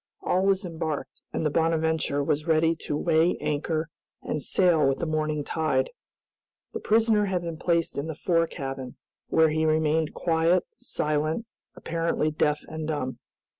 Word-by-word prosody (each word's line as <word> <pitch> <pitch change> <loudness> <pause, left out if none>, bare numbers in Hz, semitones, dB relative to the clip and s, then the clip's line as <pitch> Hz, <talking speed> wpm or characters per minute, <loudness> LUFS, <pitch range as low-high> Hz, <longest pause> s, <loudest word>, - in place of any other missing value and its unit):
All 185 +1 +1
was 195 -1 +2
embarked, 160 -5 -4
and - - -2
the 150 - +2
"Bonadventure" 160 -2 +1
was 150 +3 -1
ready 160 0 +3
to 145 - 0
weigh 165 +2 +2
anchor 155 +2 -1 0.4
and 150 - -2
sail 170 +2 +3
with 135 - +1
the - - -2
morning 155 -1 -1
tide. 160 - 0 0.8
The - - -3
prisoner 220 -1 +3
had 185 -3 -1
been 165 -2 -4
placed 170 -3 0
in 145 - -3
the 160 - -4
fore 165 +1 +1
cabin, 135 -3 -6 0.3
where 160 0 +4
he 155 +1 0
remained 155 0 +1
quiet, 165 +1 +2
silent, 155 +7 -1 0.3
apparently 165 -2 -1
deaf 150 -1 0
and 160 -1 -5
dumb. 140 -5 -3
160 Hz, 155 wpm, -26 LUFS, 150-170 Hz, 0.8 s, where